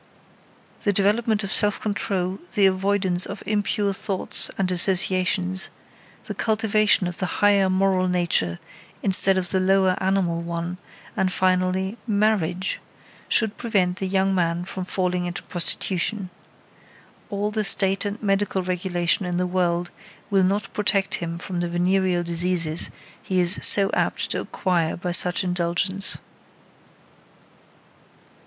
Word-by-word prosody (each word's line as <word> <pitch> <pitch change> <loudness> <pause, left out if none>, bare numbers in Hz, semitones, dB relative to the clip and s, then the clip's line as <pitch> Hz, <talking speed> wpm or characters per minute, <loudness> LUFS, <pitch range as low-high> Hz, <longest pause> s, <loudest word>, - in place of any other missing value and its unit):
The 205 - +1
development 210 +2 +1
of 195 - -4
self 205 -1 +2
control, 195 -2 -2 0.2
the 200 - +4
avoidance 190 -1 +2
of 200 +1 -7
impure 205 -1 0
thoughts 195 -1 -1
and 185 -1 0
associations, 185 0 +1 0.6
the - - -5
cultivation 215 -3 +2
of 175 -1 -4
the 185 - -1
higher 200 -2 +4
moral 185 0 +2
nature 170 - 0 0.5
instead 190 0 +3
of 180 -2 -3
the 190 - +1
lower 190 0 +3
animal 185 -3 0
one, 170 +1 -4 0.4
and, 185 -1 +1
finally, 185 +3 0
marriage, 200 -4 0 0.5
should 220 -2 +1
prevent 190 -6 0
the 190 - -3
young 195 0 +1
man 170 -1 0
from 190 -1 -6
falling 180 -1 -1
into 175 - -6
prostitution. 185 +2 -2 1.0
All 205 0 -2
the 215 0 -1
state 195 -1 +4
and 205 +1 -4
medical 195 -1 0
regulation 180 0 -1
in 175 0 -2
the 180 - +1
world 175 -1 0 0.4
will 195 -1 +4
not 195 +2 -1
protect 195 -1 0
him 170 0 -4
from 180 +1 -5
the 175 0 -1
venereal 180 0 +1
diseases 170 -1 +2 0.3
he 185 -1 -1
is 175 +2 +4
so 195 -1 +5
apt - - 0
to - - -1
acquire 170 -4 -1
by 180 0 -3
such 180 +1 +2
indulgence. 180 +2 -1
185 Hz, 135 wpm, -23 LUFS, 180-200 Hz, 1.0 s, so